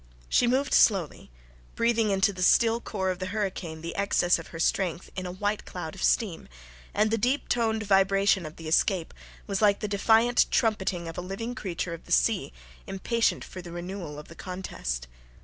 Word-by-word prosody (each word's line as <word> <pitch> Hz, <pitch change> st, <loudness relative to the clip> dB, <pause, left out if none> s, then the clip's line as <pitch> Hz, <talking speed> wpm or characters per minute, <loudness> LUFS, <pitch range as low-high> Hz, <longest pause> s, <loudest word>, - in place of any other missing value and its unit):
She 245 Hz, -, +3 dB
moved 260 Hz, +3 st, +1 dB
slowly, 190 Hz, -8 st, +3 dB, 0.5 s
breathing 230 Hz, -2 st, +2 dB
into 195 Hz, +1 st, +2 dB
the 185 Hz, -, -7 dB
still 230 Hz, +5 st, +4 dB
core 190 Hz, -5 st, -2 dB
of 180 Hz, -, -5 dB
the 185 Hz, -, -3 dB
hurricane 185 Hz, -5 st, -3 dB
the 170 Hz, +1 st, -6 dB
excess 185 Hz, -3 st, +2 dB
of 165 Hz, -, -9 dB
her 165 Hz, -, -9 dB
strength 175 Hz, 0 st, 0 dB
in 185 Hz, -1 st, -4 dB
a -, -, -5 dB
white 205 Hz, +3 st, -2 dB
cloud 170 Hz, -3 st, -6 dB
of 190 Hz, -, -10 dB
steam 200 Hz, -8 st, +1 dB, 0.4 s
and 215 Hz, +1 st, +1 dB
the 225 Hz, -, +1 dB
deep 255 Hz, +6 st, 0 dB
toned 220 Hz, -2 st, 0 dB
vibration 195 Hz, -1 st, +3 dB
of 155 Hz, -, -11 dB
the 165 Hz, -, -9 dB
escape 170 Hz, +1 st, +1 dB, 0.3 s
was 200 Hz, +1 st, -2 dB
like 205 Hz, -2 st, +4 dB
the 210 Hz, -, -3 dB
defiant 225 Hz, +4 st, +3 dB
trumpeting 190 Hz, -6 st, 0 dB
of 165 Hz, +1 st, -6 dB
a -, -, -3 dB
living 195 Hz, +6 st, -5 dB
creature 180 Hz, -7 st, -4 dB
of 165 Hz, -, -9 dB
the -, -, -13 dB
sea -, -, +2 dB, 0.4 s
impatient 230 Hz, +4 st, 0 dB
for 185 Hz, -, -9 dB
the 175 Hz, -1 st, -10 dB
renewal 175 Hz, -3 st, -6 dB
of 150 Hz, -, -10 dB
the -, -, -12 dB
contest. 175 Hz, -, -5 dB
195 Hz, 190 wpm, -27 LUFS, 175-220 Hz, 0.5 s, still